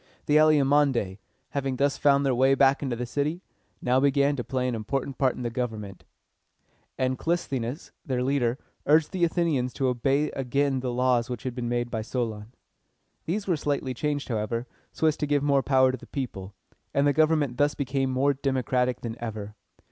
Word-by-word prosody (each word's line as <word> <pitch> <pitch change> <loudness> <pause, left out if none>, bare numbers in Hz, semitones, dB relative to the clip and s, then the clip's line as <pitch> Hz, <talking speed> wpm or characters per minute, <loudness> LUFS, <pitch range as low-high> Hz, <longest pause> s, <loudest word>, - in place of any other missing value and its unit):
The 150 - +4
Alcmæonidæ, 140 -9 +3 0.3
having 135 -2 -2
thus 140 +2 +1
found 140 -1 +4
their 135 - +2
way 130 +2 +4
back 135 0 +4
into 130 -4 -2
the 125 +1 -3
city, 150 +8 -2 0.4
now 125 +1 +3
began 140 +1 +3
to 125 - -3
play 125 0 -1
an 125 - -1
important 130 +4 -3
part 130 -2 +2
in 125 - -6
the 120 - -2
government; 110 -6 -5 0.9
and 130 0 0
Clis´the 165 -5 -1
nes, 125 +8 -6
their 125 -2 -1
leader, 130 -2 +1 0.3
urged 155 +1 +4
the 185 -3 -1
Athenians 160 -7 +1
to 135 -2 0
obey 135 +4 +1
again 135 +1 0
the 125 -1 -2
laws 125 -1 +1
which 125 -3 -5
had 130 - -3
been 120 -1 -3
made 120 0 -1
by 110 - -2
Solon. 110 -2 -4 0.7
These 200 +5 -2
were 180 - +1
slightly 140 -3 -2
changed, 145 +3 -2
however, 115 +1 -2 0.3
so - - -2
as 155 -2 +4
to 150 - -2
give 145 -1 +1
more 140 -1 +3
power 130 -1 +4
to 130 - -4
the - - -13
people; 105 -8 -5 0.4
and 140 - +3
the 145 - +4
government 155 -4 +2
thus 145 0 +2
became 135 -1 -1
more 135 +2 +2
democratic 130 -2 0
than 115 -1 -4
ever. 105 -2 -5
130 Hz, 190 wpm, -26 LUFS, 120-145 Hz, 0.9 s, The